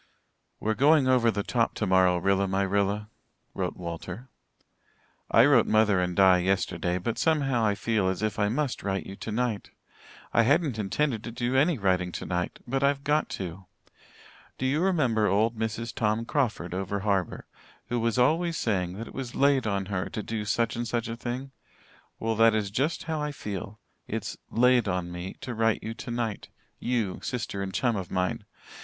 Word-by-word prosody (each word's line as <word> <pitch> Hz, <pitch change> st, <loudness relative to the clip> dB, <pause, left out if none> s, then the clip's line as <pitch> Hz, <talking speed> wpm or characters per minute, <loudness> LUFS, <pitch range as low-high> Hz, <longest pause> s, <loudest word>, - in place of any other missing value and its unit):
"We're 110 Hz, -, 0 dB
going 140 Hz, +3 st, +4 dB
over 125 Hz, -3 st, +4 dB
the 100 Hz, -2 st, -1 dB
top 115 Hz, +1 st, 0 dB
tomorrow, 95 Hz, -3 st, +3 dB
Rilla 95 Hz, +2 st, +2 dB
my 95 Hz, +1 st, +1 dB
Rilla," 100 Hz, +2 st, 0 dB, 0.4 s
wrote -, -, -3 dB
Walter. 90 Hz, +7 st, -7 dB, 1.0 s
"I 115 Hz, +3 st, +6 dB
wrote 135 Hz, -6 st, +5 dB
mother 110 Hz, -3 st, +4 dB
and 90 Hz, -1 st, -1 dB
Di 95 Hz, -1 st, +6 dB
yesterday, 90 Hz, -2 st, 0 dB
but 110 Hz, +5 st, -3 dB
somehow 140 Hz, -7 st, +2 dB
I 105 Hz, -2 st, +2 dB
feel 105 Hz, -2 st, 0 dB
as 95 Hz, +3 st, -2 dB
if 110 Hz, 0 st, -1 dB
I 105 Hz, -1 st, +2 dB
must 135 Hz, +3 st, -1 dB
write 95 Hz, -1 st, -2 dB
you 95 Hz, -, -8 dB
tonight. 110 Hz, +1 st, -2 dB, 0.6 s
I -, -, +5 dB
hadn't 140 Hz, -1 st, +2 dB
intended 115 Hz, +3 st, 0 dB
to 120 Hz, -, -6 dB
do 120 Hz, +2 st, -2 dB
any 150 Hz, +4 st, +3 dB
writing 90 Hz, -3 st, +1 dB
tonight 90 Hz, 0 st, -3 dB
but 135 Hz, +2 st, -1 dB
I've 140 Hz, 0 st, +2 dB
got 150 Hz, +2 st, +1 dB
to. 95 Hz, 0 st, -7 dB, 0.9 s
Do 130 Hz, -, -2 dB
you 140 Hz, +5 st, +1 dB
remember 135 Hz, -, +2 dB
old 110 Hz, +4 st, +2 dB
Mrs. 110 Hz, +1 st, -3 dB
Tom 110 Hz, +1 st, 0 dB
Crawford 115 Hz, -, -1 dB
over 95 Hz, +2 st, -2 dB
harbour, 95 Hz, -3 st, -1 dB, 0.4 s
who 120 Hz, 0 st, 0 dB
was 115 Hz, 0 st, 0 dB
always 165 Hz, +7 st, +2 dB
saying 90 Hz, -5 st, 0 dB
that 115 Hz, +5 st, -7 dB
it -, -, -11 dB
was 130 Hz, -3 st, -6 dB
'laid 140 Hz, -4 st, +3 dB
on 100 Hz, -2 st, -1 dB
her' 95 Hz, -2 st, -3 dB
to 105 Hz, -, -4 dB
do 110 Hz, -1 st, -3 dB
such 115 Hz, +2 st, 0 dB
and 120 Hz, 0 st, -3 dB
such 120 Hz, 0 st, -2 dB
a 115 Hz, -, -3 dB
thing? 125 Hz, +3 st, -5 dB, 0.7 s
Well, 115 Hz, 0 st, 0 dB
that 115 Hz, 0 st, +5 dB
is 105 Hz, -2 st, -1 dB
just 145 Hz, +10 st, 0 dB
how 160 Hz, -2 st, -2 dB
I 150 Hz, 0 st, -2 dB
feel. 105 Hz, -5 st, -6 dB, 0.3 s
It's -, -, -4 dB
'laid 125 Hz, -1 st, +4 dB
on 90 Hz, -2 st, -2 dB
me' 90 Hz, +2 st, -6 dB
to 125 Hz, -, -5 dB
write 115 Hz, -1 st, +1 dB
you 110 Hz, -, -4 dB
tonight 120 Hz, -2 st, -4 dB, 0.3 s
you, 115 Hz, -6 st, -1 dB
sister 115 Hz, -5 st, -3 dB
and 95 Hz, -1 st, -3 dB
chum 120 Hz, +4 st, +1 dB
of 95 Hz, -3 st, -4 dB
mine. 90 Hz, 0 st, -1 dB
110 Hz, 180 wpm, -27 LUFS, 95-125 Hz, 1.0 s, I